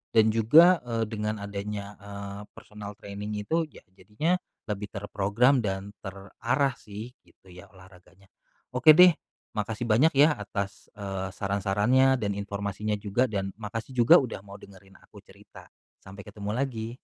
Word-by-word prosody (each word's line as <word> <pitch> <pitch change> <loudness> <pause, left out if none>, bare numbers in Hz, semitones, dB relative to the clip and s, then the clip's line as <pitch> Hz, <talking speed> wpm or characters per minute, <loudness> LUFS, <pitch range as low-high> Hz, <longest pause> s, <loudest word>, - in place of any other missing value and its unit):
dan 110 -1 +5
juga, 155 +12 +6
eee, 115 -1 -1
dengan 105 0 -3
adanya, 100 0 -5
eee, 100 0 -8
personal 105 -1 -10
training 105 +1 -6
itu, 160 +8 0
ya, - - -17
jadinya 105 - -1 0.3
lebih 105 -1 -4
terprogram 105 +6 +1
dan 95 0 -3
terarah 115 +7 -2
sih 105 +3 -9
gitu - - -26
ya 90 0 -13
olahraganya. 95 0 -19 0.5
Oke 155 +5 +8
deh, 180 -1 +8 0.4
makasih 110 +2 -3
banyak 125 +9 +4
ya 145 +3 +6
atas, 100 -1 -5
eee, 95 -2 -4
saran-sarannya 105 +7 +2
dan 105 -3 -1
informasinya 100 +1 -3
juga, 105 +5 0
dan 100 -3 -3
makasih 115 +4 -6
juga 125 +9 +7
udah 125 -7 -4
mau 100 0 -12
dengerin 95 0 -16
aku - - -16
cerita. - - -16 0.3
Sampai 100 +1 -12
ketemu 105 0 -6
lagi. 120 -3 -3
105 Hz, 145 wpm, -27 LUFS, 100-120 Hz, 0.5 s, Oke